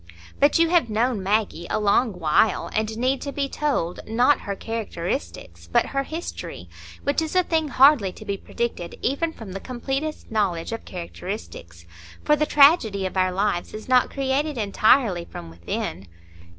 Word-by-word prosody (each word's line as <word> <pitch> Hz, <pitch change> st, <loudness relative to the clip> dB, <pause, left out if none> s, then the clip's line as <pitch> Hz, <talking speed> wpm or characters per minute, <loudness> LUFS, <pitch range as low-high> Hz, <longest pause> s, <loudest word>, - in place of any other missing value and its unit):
But 285 Hz, +3 st, +4 dB
you 335 Hz, 0 st, +4 dB
have 340 Hz, -8 st, +3 dB
known 225 Hz, 0 st, 0 dB
Maggie 195 Hz, -3 st, -1 dB
a -, -, 0 dB
long 210 Hz, +2 st, +2 dB
while, 175 Hz, +4 st, +1 dB
and 220 Hz, 0 st, -1 dB
need 255 Hz, +3 st, 0 dB
to 280 Hz, -, -4 dB
be 280 Hz, 0 st, -1 dB
told, 270 Hz, -, -1 dB
not 245 Hz, +5 st, +3 dB
her 200 Hz, -, -4 dB
characteristics, 170 Hz, -, -5 dB
but -, -, +3 dB
her 275 Hz, -, +1 dB
history, 320 Hz, +5 st, -6 dB, 0.4 s
which 285 Hz, +3 st, +1 dB
is 320 Hz, +2 st, -4 dB
a 365 Hz, -, +5 dB
thing 320 Hz, -2 st, 0 dB
hardly 270 Hz, -8 st, +5 dB
to 215 Hz, -, -12 dB
be 200 Hz, -2 st, -2 dB
predicted 195 Hz, -4 st, -4 dB
even 300 Hz, +6 st, 0 dB
from 225 Hz, -10 st, -10 dB
the 195 Hz, -, -5 dB
completest 270 Hz, +7 st, -4 dB
knowledge 190 Hz, -6 st, 0 dB
of 225 Hz, -, -5 dB
characteristics. 170 Hz, -, -7 dB, 0.4 s
For 300 Hz, -, +4 dB
the 305 Hz, +1 st, 0 dB
tragedy 275 Hz, -, +5 dB
of 185 Hz, -, -4 dB
our 185 Hz, -1 st, +2 dB
lives 190 Hz, -1 st, -1 dB
is 215 Hz, -, -8 dB
not 255 Hz, -1 st, +4 dB
created 275 Hz, +1 st, -1 dB
entirely 215 Hz, -2 st, +3 dB
from 85 Hz, -, -9 dB
within. 85 Hz, +2 st, -5 dB
225 Hz, 165 wpm, -24 LUFS, 185-275 Hz, 0.4 s, a